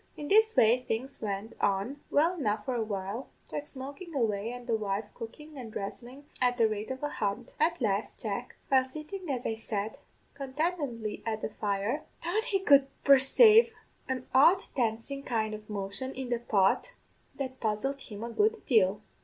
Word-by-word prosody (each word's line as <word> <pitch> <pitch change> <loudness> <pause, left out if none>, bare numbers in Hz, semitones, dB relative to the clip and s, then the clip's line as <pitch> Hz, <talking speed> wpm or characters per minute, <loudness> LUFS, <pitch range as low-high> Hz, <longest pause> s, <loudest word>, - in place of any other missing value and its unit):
"In 295 -1 -6
this 440 +2 +5
way 235 +3 +5
things 255 +3 -3
went 205 +1 -3
on 205 +9 0
well 320 +5 +3
enough 215 -10 -1
for 260 - -1
a 240 - 0
while, 205 +3 -4 0.2
Jack 295 0 -4
smokin' 285 +5 -8
away, 220 -3 0
an' 245 0 -8
the 235 -2 +1
wife 205 -1 -2
cookin' 300 +7 -9
and 230 -3 -7
dhressin' 245 +8 -7 0.2
at 245 -1 +3
the 230 -2 +5
rate 215 0 -4
of 260 +2 -5
a 295 - 0
hunt. 215 0 -3
At 335 +2 +2
last, 205 -2 -1
Jack, 220 +3 -4
while 265 -1 +5
sittin', 310 +7 -7
as 255 -3 -2
I - - 0
said, 220 -1 -4 0.3
contentedly 275 -5 -2
at 220 -1 -3
the - - -1
fire, 210 +6 -1 0.2
thought 425 +7 0
he 390 -4 +1
could 280 -6 +6 0.2
persave 430 - +7 0.4
an 255 -1 -2
odd 330 +8 +6
dancin' 240 +2 -1
kind 220 -5 -1
of 215 0 -9
motion 205 +6 -4
in 260 -1 -5
the 240 -1 0
pot 215 - +2 0.4
that 260 -2 -5
puzzled 230 +6 -1
him 210 -3 -8
a 235 - -4
good 430 - +1
deal. 210 -4 +3
245 Hz, 180 wpm, -30 LUFS, 215-285 Hz, 0.4 s, persave